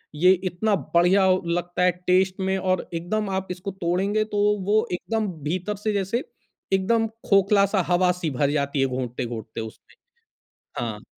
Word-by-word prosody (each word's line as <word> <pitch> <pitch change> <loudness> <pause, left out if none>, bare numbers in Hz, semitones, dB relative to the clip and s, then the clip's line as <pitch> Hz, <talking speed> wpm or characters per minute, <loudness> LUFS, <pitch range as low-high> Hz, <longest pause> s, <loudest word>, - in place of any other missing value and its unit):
ये 180 +5 +5 0.2
इतना 205 +5 +1 0.2
बढ़िया 185 +3 +4 0.2
लगता 175 +1 -1
है 180 - +5 0.2
टेस्ट 185 +1 +3
में 190 0 0
और 185 -1 -1
एकदम 195 +5 -2
आप 190 0 -2
इसको 185 +2 -5
तोड़ेंगे 200 +5 +1
तो - - +1 0.3
वो 215 +2 +3
एकदम 220 +4 -2 0.2
भीतर 185 +6 -2
से 210 +1 -2
जैसे 200 +5 -1 0.5
एकदम 225 +4 +2 0.2
खोखला-सा 200 0 +4
हवा-सी 180 -1 +1
भर 145 +1 +2
जाती 140 -1 -1
है - - +4
घूँटते-घूँटते 120 -3 -4
उसमें। 110 -1 -11 0.9
हाँ। - - -6
185 Hz, 145 wpm, -24 LUFS, 170-200 Hz, 0.9 s, ये